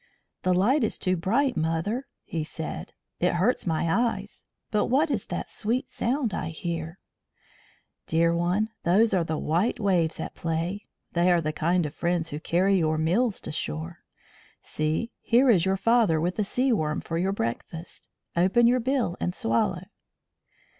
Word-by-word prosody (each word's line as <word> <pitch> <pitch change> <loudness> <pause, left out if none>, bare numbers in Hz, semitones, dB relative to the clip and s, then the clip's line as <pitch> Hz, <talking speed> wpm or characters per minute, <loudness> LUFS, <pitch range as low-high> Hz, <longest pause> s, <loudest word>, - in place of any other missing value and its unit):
"The 185 0 +2
light 235 +10 +3
is 220 - 0
too 185 -1 0
bright, 235 +10 +1
mother," 165 - -1 0.2
he 160 -2 -3
said. 160 0 -6 0.3
"It 180 0 +2
hurts 195 +4 +1
my 165 0 0
eyes. 230 +7 -1 0.3
But 210 - +2
what 290 +5 +2
is 225 -8 -2
that - - -4
sweet 245 +5 -2
sound 245 -3 -1
I - - -2
hear?" 165 +1 -4 1.1
"Dear 165 +1 +2
one, 180 +6 +1
those 200 +5 +4
are 180 -3 +3
the 160 -1 -2
white 180 +13 0
waves 180 -6 +1
at - - -5
play. 170 +5 -3 0.3
They 175 +1 +3
are 175 - +4
the 155 -1 -2
kind 165 -1 0
friends 170 -1 -1
who 150 - -5
carry 185 +4 +2
your 155 -1 +1
meals 190 +8 +1
to - - -6
shore. 80 - -5 0.6
See 155 +10 -2
here 245 +2 +4
is 180 -5 +3
your 190 0 +1
father 225 -7 +3
with 175 +5 -1
a - - +3
sea 250 +5 +1
worm 155 -6 0
for 165 0 -3
your 190 +2 +1
breakfast. 165 - -5 0.3
Open 190 +7 +4
your 245 +2 +4
bill 250 -7 0
and 180 - -2
swallow." 115 +1 0
180 Hz, 165 wpm, -26 LUFS, 165-225 Hz, 1.1 s, those